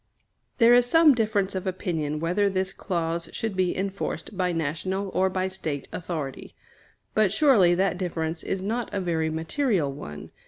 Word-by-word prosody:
There 235 0 +6
is 245 0 +5
some 320 +2 +6
difference 215 -5 0
of 190 0 -3
opinion 160 -5 -2
whether 180 +5 +1
this 190 0 -1
clause 170 -2 -2
should 225 -3 -3
be 185 -1 +1
enforced 195 +2 -4
by 180 -1 0
national 170 +5 -2
or 190 0 +1
by 185 0 -1
State 160 -7 -4
authority; 160 -6 -5 0.6
but 215 -3 +3
surely 215 - +5
that 185 0 +1
difference 165 -3 -2
is 190 -1 -3
not 230 +4 -2
a 200 - -1
very 165 -3 0
material 160 - 0
one. 75 - -9
185 Hz, 160 wpm, -26 LUFS, 165-200 Hz, 0.6 s, There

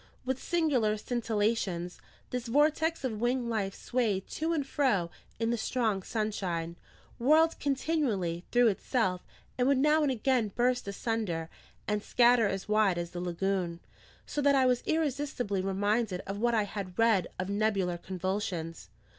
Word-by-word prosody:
With 260 0 -2
singular 280 -11 +1
scintillations, 210 -6 -1 0.3
this 250 -1 -3
vortex 305 +5 +2
of 225 -5 -3
winged 245 0 +1
life 205 -4 -1
swayed 220 -6 -1
to 320 +2 -2
and 305 -4 0
fro 205 -13 +1 0.3
in 225 0 +1
the 235 - -1
strong 220 -5 0
sunshine, 185 -6 -2 0.4
whirled 315 +6 +4
continually 260 - -1
through 245 -1 +5
itself, 190 -3 0 0.4
and 250 - +3
would 275 -1 +4
now 300 +3 +4
and 290 -3 +2
again 245 -4 +1
burst 250 -1 +1
asunder 200 -6 -2 0.4
and 210 0 0
scatter 240 0 +4
as 195 -1 -3
wide 210 -4 +3
as 170 0 -4
the 175 - -5
lagoon: 180 -1 -1 0.5
so 295 - -3
that 280 0 +4
I 265 -1 +4
was 250 -1 +2
irresistibly 280 -10 -1
reminded 200 +1 0
of 195 +1 -6
what 235 +1 +2
I 215 - +3
had 195 -3 -6
read 225 -6 +3
of 185 +1 -3
nebular 200 -4 0
convulsions. 180 - -4
220 Hz, 150 wpm, -30 LUFS, 190-255 Hz, 0.5 s, through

